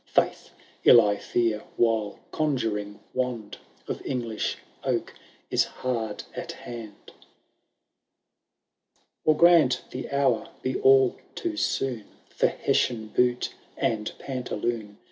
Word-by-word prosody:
Faith! - - +1 0.3
ill, 120 - +9
I 105 -3 +3
fear, 115 -2 0 0.2
while 110 -3 +2
conjuring 110 -9 -1
wand 125 -5 -3 0.3
Of - - -4
English 120 -4 -2 0.3
oak - - -1 0.4
is - - +3 0.2
haxd 115 -4 -2
at - - -5
hand. 115 -4 -8
II. - - -19 2.1
Or 155 -1 +4
grant 170 -7 +6
the 130 - -5
hour 135 -5 +1
be 130 0 -1
all 135 -1 +5 0.2
too 340 -2 -2
soon 130 - -1 0.3
For - - +3
Hessian 110 -3 0
boot 125 +2 +1 0.2
and 105 -2 0
pantaloon. 120 -5 -3
120 Hz, 110 wpm, -26 LUFS, 110-130 Hz, 2.1 s, ill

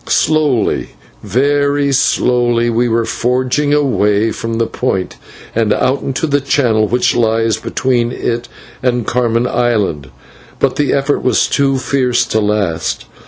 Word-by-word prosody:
Slowly, 150 -8 +1 0.3
very 140 +2 +1
slowly, 120 -3 +1
we 120 +1 +1
were 115 0 +1
forging 130 +5 0
away 115 -7 +2
from 115 +1 -4
the 115 0 +1
Point 95 -6 -3 0.4
and 110 -2 +1
out 130 +5 +1
into 135 +4 -2
the 145 -2 +1
channel 120 -6 +1
which 125 +1 +1
lies 115 -2 +1
between 120 +1 -1
it 120 -1 -3 0.3
and 125 -2 0
Carmen 120 0 0
Island, 105 - -1 0.5
but - - 0
the 145 - +1
effort 140 +1 0
was 125 -5 +2
too 135 -1 +1
fierce 130 -2 0
to 110 - 0
last. 105 -6 -1
120 Hz, 135 wpm, -15 LUFS, 115-135 Hz, 0.5 s, away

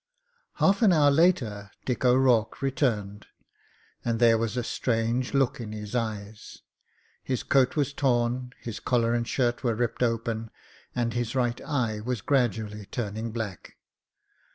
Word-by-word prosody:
Half 200 +2 +2
an 215 -4 +6
hour 150 -4 +5
later 125 - +2 0.2
Dick 125 -1 -2
O'Rourke 125 -2 +3
returned, 110 -7 -1 0.8
and 115 -1 -1
there 115 -1 +6
was 115 +2 -2
a 125 - 0
strange 120 +3 -1
look 135 -3 +1
in 110 -2 -6
his 105 0 -7
eyes. 110 -3 -4 0.6
His 130 -2 -2
coat 135 -2 +3
was 145 -2 0
torn, 125 -2 0
his 115 -2 -6
collar 120 -2 +1
and 120 -1 -1
shirt 120 -2 0
were 120 -3 +1
ripped 115 +1 -2
open, 115 -1 -1 0.5
and 120 -2 0
his 120 0 -2
right 120 -2 0
eye 115 -7 -1
was 120 0 -3
gradually 110 -6 0
turning 110 0 -4
black. 110 -5 -6
120 Hz, 145 wpm, -27 LUFS, 110-130 Hz, 0.8 s, an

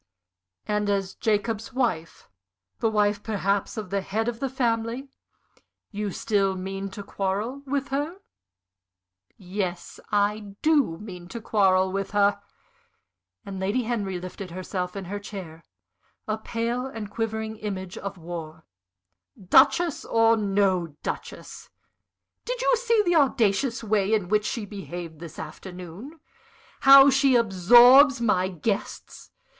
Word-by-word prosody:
"And 210 0 -1
as 195 -1 -1
Jacob's 220 +2 -1
wife 225 -11 -2 0.5
the 225 - +2
wife 210 -1 +1
perhaps 200 -1 -1
of 210 -4 -6
the 200 0 0
head 220 +4 -2
of 235 -1 -3
the 270 0 -2
family 240 +1 -1 0.8
you 210 -1 -3
still 195 0 0
mean 195 +1 -5
to 200 +1 -8
quarrel 205 +7 -3
with 275 0 -2
her?" 290 +5 -2 1.2
"Yes, 185 -2 -5
I 205 0 0
do 290 - +3
mean 180 -3 -10
to 235 - -7
quarrel 190 -4 +2
with 195 +1 -3
her!" 205 0 +2 1.0
and 195 -1 -6
Lady 205 +7 0
Henry 205 -6 -2
lifted 185 +1 -8
herself 180 +1 -4
in 195 -1 -5
her 205 +3 -5
chair, 185 -6 -9 0.6
a 215 0 -2
pale 235 +3 -2
and 220 -5 -7
quivering 220 -1 -3
image 190 -4 -5
of 200 -1 -6
war 165 -2 -8 0.7
"Duchess 315 - +4
or 225 0 +3
no 195 -6 0
Duchess! - - -7 0.7
Did - - -4
you - - +3
see 465 -2 +2
the 350 0 +2
audacious 245 -2 +1
way 215 -1 +2
in 190 -5 -2
which 210 0 +2
she 230 -3 -3
behaved 175 -5 -8
this 170 -2 -10
afternoon? 185 - -9 0.6
how 275 0 +9
she 270 -1 +3
absorbs 240 +6 +7
my 195 -6 +2
guests? 195 +3 -4
205 Hz, 130 wpm, -25 LUFS, 190-235 Hz, 1.2 s, how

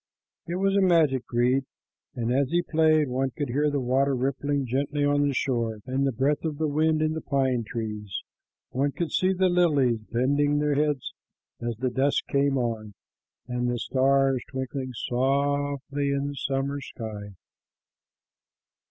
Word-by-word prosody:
It 170 - -3
was 195 +1 +1
a 200 - +4
magic 160 -8 +3
reed, 125 +3 +2 0.5
and 120 -1 -1
as 135 0 +2
he 175 +2 +1
played, 155 -2 +3
one 130 +1 0
could 145 -4 -2
hear 145 +5 +1
the 145 -1 -1
water 135 +2 +1
rippling 140 +2 -1
gently 140 +4 0
on 145 0 +2
the 140 - 0
shore 115 -5 0
and 135 +1 0
the - - +1
breath 135 +4 0
of 155 -3 -2
the 155 0 0
wind 155 +1 +2
in 155 0 +1
the 160 - -4
pine 130 -4 0
trees; 105 -3 -5 0.5
one 140 +2 0
could 170 -4 -3
see 185 +1 +2
the 190 0 +2
lilies 150 -10 +3
bending 145 +4 +2
their 150 0 +1
heads 145 -2 0 0.5
as 120 -1 -2
the 130 +1 -1
dusk 135 +3 +1
came 140 0 +2
on, 110 -4 -3 0.5
and 125 0 -1
the 120 - -1
stars 135 +1 +2
twinkling 130 0 -4 0.2
softly 140 +2 0
in 140 0 -1
the 145 - -6
summer 140 +1 -2
sky. 105 -6 -7
140 Hz, 160 wpm, -26 LUFS, 125-145 Hz, 0.5 s, a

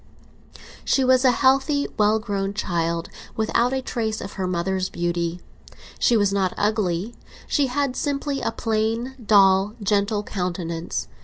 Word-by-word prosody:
She 270 - +2
was 255 0 +4
a 260 - +6
healthy 270 +3 +2
well 210 +1 +3
grown 200 -2 -3
child, 170 -4 -1 0.3
without 230 +3 +1
a 265 0 -2
trace 220 -3 -2
of 195 - -7
her 190 -2 -3
mother's 185 +1 -1
beauty. 170 0 -2 0.6
She 235 - +4
was 205 -2 +2
not 190 -2 0
ugly; 205 -1 0 0.3
she 285 -3 +1
had 270 0 -1
simply 285 0 -2
a - - -1
plain, 225 +3 -1
dull, 200 0 +4
gentle 205 +1 +1
countenance. 175 -4 -3
210 Hz, 140 wpm, -23 LUFS, 185-245 Hz, 0.6 s, a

